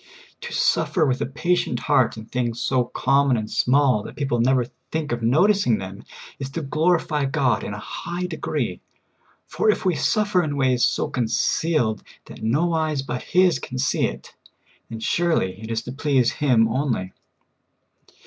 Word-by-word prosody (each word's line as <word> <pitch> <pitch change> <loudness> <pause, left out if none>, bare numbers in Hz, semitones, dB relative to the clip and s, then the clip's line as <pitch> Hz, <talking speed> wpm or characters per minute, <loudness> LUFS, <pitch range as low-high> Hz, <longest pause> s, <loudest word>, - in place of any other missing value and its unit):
To 475 0 -7
suffer 190 - +2
with 130 -2 0
a - - 0
patient 150 -3 -1
heart 120 -3 +2
in 110 - -8
things 120 -1 -2
so 125 0 +1
common 135 +1 +2
and 110 -1 -3
small 130 -3 +3
that - - -10
people 135 -4 -1
never 130 0 +2 0.3
think 160 -2 -2
of 120 0 -2
notic 185 - +3
ing 115 -3 +3
them 95 +1 -8 0.3
is 135 -1 -4
to 165 - -2
glorify 155 0 +1
God 135 -3 +1
in 105 - -5
a - - -6
high 175 +10 -5
degree; 180 - -3 0.6
for 435 - 0
if 425 - +1
we 185 - +3
suffer 205 +2 +1
in 145 -3 -3
ways 130 -2 +2
so - - +1
concealed 120 0 0 0.2
that - - -12
no 150 +10 +1
eyes 155 -4 0
but 125 -2 -4
His 180 -6 +3
can 130 - -7
see 130 - +1
it, - - -9 0.6
then 115 -1 -7
surely 110 - 0
it 110 - -8
is 115 0 -2
to 125 - -7
please 135 -3 +1
Him 125 -6 +3
only. 115 -6 -2
135 Hz, 170 wpm, -23 LUFS, 120-160 Hz, 0.6 s, small